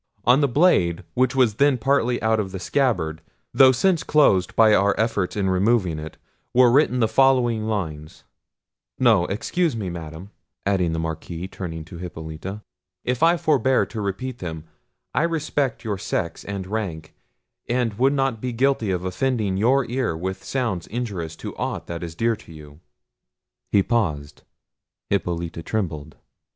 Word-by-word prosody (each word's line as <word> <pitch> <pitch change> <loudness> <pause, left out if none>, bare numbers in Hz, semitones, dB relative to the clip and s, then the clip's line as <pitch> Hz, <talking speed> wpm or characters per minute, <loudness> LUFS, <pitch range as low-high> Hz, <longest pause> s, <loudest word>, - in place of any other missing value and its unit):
On 125 +5 +5
the 140 - +4
blade, 120 - +3
which 130 0 +1
was 120 -6 +3
then 140 -2 +4
partly 125 -1 +1
out 110 0 +2
of 95 -3 -3
the 95 - -5
scabbard, 90 - 0 0.3
though 130 -1 +7
since 170 +6 +2
closed 105 -12 +3
by 110 -1 +6
our 100 0 +3
efforts 110 -4 0
in 100 -2 0
removing 95 -3 +1
it, 75 0 -8 0.4
were 125 -1 +6
written 125 -2 +3
the 110 - +4
following 120 -2 +3
lines—no; 90 +4 -2
excuse 155 - -1
me, 100 -5 -3
Madam," 85 +3 -8 0.3
added 95 -4 +1
the - - -2
Marquis, 80 +2 -4
turning 80 -5 -6
to 85 0 -10
Hippolita; 90 +3 -7 0.4
"if 125 -1 -2
I 170 +1 +5
forbear 135 -5 +2
to 110 - -6
repeat 120 +6 -4
them: 80 -3 -6 0.5
I - - +2
respect 155 -5 -1
your 105 -4 -3
sex 85 -4 -3
and 100 -2 -4
rank, 95 -7 -4 0.6
and 120 -2 0
would 135 +2 +4
not 135 -5 0
be 125 -1 -3
guilty 130 -3 +1
of 90 -1 -1
offending 105 +1 -1
your 125 +7 +3
ear 120 -8 -2
with 95 +2 -4
sounds 115 -10 -2
injurious 100 -9 -4
to - - -8
aught - - -3
that 85 -1 -6
is 85 -2 -6
dear 115 +4 +1
to - - -15
you." 75 -1 -13 0.9
He 100 - +4
paused. 75 -12 -1 0.7
Hippolita 85 -4 -2
trembled. 80 -6 -4
105 Hz, 155 wpm, -23 LUFS, 85-125 Hz, 0.9 s, though